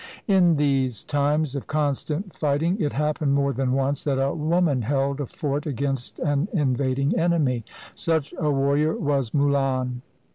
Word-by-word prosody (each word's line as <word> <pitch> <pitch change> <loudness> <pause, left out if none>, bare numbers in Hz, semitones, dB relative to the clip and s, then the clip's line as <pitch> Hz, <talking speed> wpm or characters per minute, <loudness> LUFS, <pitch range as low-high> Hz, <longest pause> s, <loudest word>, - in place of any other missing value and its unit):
In 180 -5 +4
these 135 -5 +1
times 145 0 0
of 140 - -5
constant 155 +4 -2
fighting, 160 +6 0
it 145 -3 0
happened 150 -1 0
more 140 0 +1
than 130 +1 -1
once 135 +1 0
that 135 -3 0
a 135 +1 +1
woman 155 -3 +1
held 140 +3 0
a 140 - -3
fort 145 +4 -3
against 135 -2 -3
an 145 +1 0
invading 140 - 0
enemy. 155 -8 +1 0.3
Such 160 -3 -1
a 155 -4 +1
warrior 140 +3 +2
was 140 -5 0
Mulan. 135 -3 0
140 Hz, 150 wpm, -24 LUFS, 135-155 Hz, 0.3 s, In